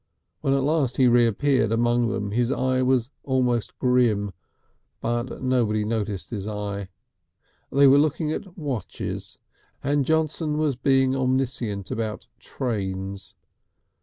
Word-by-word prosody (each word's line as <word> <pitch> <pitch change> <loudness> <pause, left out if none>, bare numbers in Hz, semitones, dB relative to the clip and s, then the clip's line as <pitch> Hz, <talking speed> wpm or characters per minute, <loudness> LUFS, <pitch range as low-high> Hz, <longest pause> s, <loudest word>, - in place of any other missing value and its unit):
When 135 0 +1
at 135 - +1
last 140 -4 +1
he 130 - +5
reappeared 120 0 +3
among 120 +1 +2
them 105 -2 -2
his 120 +3 +1
eye 130 -1 +1
was 130 -1 +1
almost 125 -4 0
grim, 120 -5 +2 0.7
but 120 +3 -3
nobody 115 -5 +1
noticed 105 -3 -3
his 105 -3 -4
eye. 100 -2 -4 0.8
They 140 +1 +5
were 140 +1 +7
looking 155 +1 +1
at 190 +3 -6
watches, 135 - -5 0.5
and 145 +1 +2
Johnson 155 0 0
was 150 -3 +1
being 135 +1 +2
omniscient 125 -6 -1
about 110 -2 -3
trains. 95 -5 -4
125 Hz, 125 wpm, -24 LUFS, 110-135 Hz, 0.8 s, were